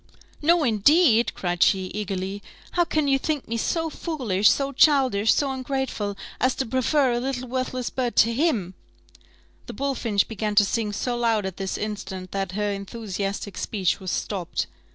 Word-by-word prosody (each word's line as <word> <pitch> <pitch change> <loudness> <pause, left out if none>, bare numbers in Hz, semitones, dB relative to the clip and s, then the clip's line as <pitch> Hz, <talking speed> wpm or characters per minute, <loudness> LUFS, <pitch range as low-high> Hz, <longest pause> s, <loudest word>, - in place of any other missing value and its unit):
"No, 335 +2 +4
indeed!" 240 - +4
cried 175 -1 -3
she, 190 -2 +3
eagerly: 195 -1 -3 0.3
"how 350 - +3
can 310 -3 0
you 270 -1 +3
think 300 -1 -2
me 230 - -3
so 325 +7 -1
foolish, 235 - +1
so 275 0 +1
childish, 260 -7 +4
so 280 -2 +1
ungrateful, 260 -6 -3 0.2
as 255 0 +2
to 265 - -1
prefer 260 +3 +2
a 240 - 0
little 255 0 -3
worthless 255 0 -3
bird 250 -2 -2
to 230 +1 +4
him 230 - 0 0.4
" - - -30
(the - - -6
bullfinch 235 -7 0
began 215 -1 -3
to 205 0 +6
sing 215 0 -1
so 240 +4 -2
loud 230 -4 +1
at 190 -2 -5
this 190 -1 -3
instant, 190 -3 -5
that 195 -2 -3
her 205 +1 -1
enthusiastic 200 -1 -4
speech 190 -5 0
was 190 -2 -5
stopped). 180 -1 -2
230 Hz, 170 wpm, -24 LUFS, 200-265 Hz, 0.4 s, to